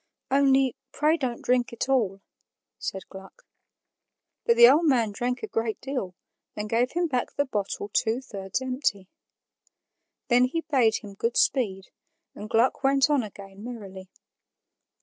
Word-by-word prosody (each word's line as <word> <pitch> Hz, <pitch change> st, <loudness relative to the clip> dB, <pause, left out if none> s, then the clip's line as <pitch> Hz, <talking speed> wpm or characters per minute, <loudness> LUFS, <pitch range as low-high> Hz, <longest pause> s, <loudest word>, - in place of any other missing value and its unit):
"Only 270 Hz, -2 st, +3 dB, 0.2 s
pray 305 Hz, +2 st, +2 dB
don't 255 Hz, -7 st, -3 dB
drink 250 Hz, -1 st, +1 dB
it 235 Hz, +2 st, -3 dB
all," 215 Hz, -8 st, +1 dB, 0.6 s
said 190 Hz, -, -5 dB
Gluck. 195 Hz, -, -13 dB, 1.0 s
But 465 Hz, -, +5 dB
the 475 Hz, 0 st, +9 dB
old 330 Hz, -2 st, +5 dB
man 240 Hz, -8 st, +2 dB
drank 250 Hz, -, -3 dB
a -, -, -2 dB
great 225 Hz, -, -2 dB
deal 255 Hz, -10 st, -4 dB, 0.4 s
and 210 Hz, 0 st, -4 dB
gave 240 Hz, +2 st, +1 dB
him 350 Hz, +1 st, +1 dB
back 255 Hz, -5 st, -2 dB
the 285 Hz, -, +1 dB
bottle 205 Hz, -5 st, -3 dB
two 225 Hz, +1 st, +1 dB
thirds 200 Hz, -2 st, -5 dB
empty. 250 Hz, -7 st, -2 dB, 1.2 s
Then 245 Hz, 0 st, +5 dB
he 330 Hz, +6 st, -2 dB
bade 260 Hz, -8 st, +2 dB
him 205 Hz, -1 st, -9 dB
good 230 Hz, +4 st, -2 dB
speed, 195 Hz, -8 st, +1 dB, 0.4 s
and 210 Hz, -, -9 dB
Gluck 235 Hz, +5 st, +2 dB
went 275 Hz, +2 st, +3 dB
on 285 Hz, -3 st, +3 dB
again 200 Hz, -2 st, -10 dB
merrily. 195 Hz, -6 st, -9 dB
245 Hz, 150 wpm, -26 LUFS, 205-270 Hz, 1.2 s, the